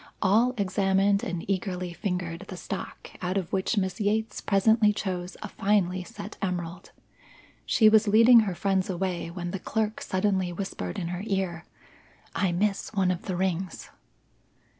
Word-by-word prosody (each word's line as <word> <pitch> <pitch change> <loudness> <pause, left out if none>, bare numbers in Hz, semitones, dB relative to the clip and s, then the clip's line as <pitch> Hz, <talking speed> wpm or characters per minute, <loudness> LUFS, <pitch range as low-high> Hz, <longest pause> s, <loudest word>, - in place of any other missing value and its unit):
All 225 +6 +3
examined 195 0 +2
and 175 -2 -4
eagerly 185 -2 -2
fingered 180 0 -3
the 185 - -7
stock 190 - -6
out 185 +1 -1
of 185 -4 -3
which 195 +4 0
Miss 190 -2 -1
Yates 215 +2 0
presently 215 +2 +4
chose 185 -3 -4
a - - -4
finely 190 -3 +1
set 205 +4 -9
emerald. 175 -2 -3 0.8
She 220 - +5
was 215 0 +5
leading 230 +3 +7
her 200 -5 0
friends 190 0 0
away 180 -2 -2
when 175 0 -5
the 195 - -4
clerk 220 +2 -2
suddenly 190 -1 0
whispered 170 - -5
in 170 - -3
her 180 +1 -4
ear, 185 -4 -2 0.7
"I 190 -3 +1
miss 195 +3 0
one 190 -2 +3
of 180 - -4
the 185 - -1
rings." 185 -1 -2
190 Hz, 155 wpm, -27 LUFS, 180-205 Hz, 0.8 s, leading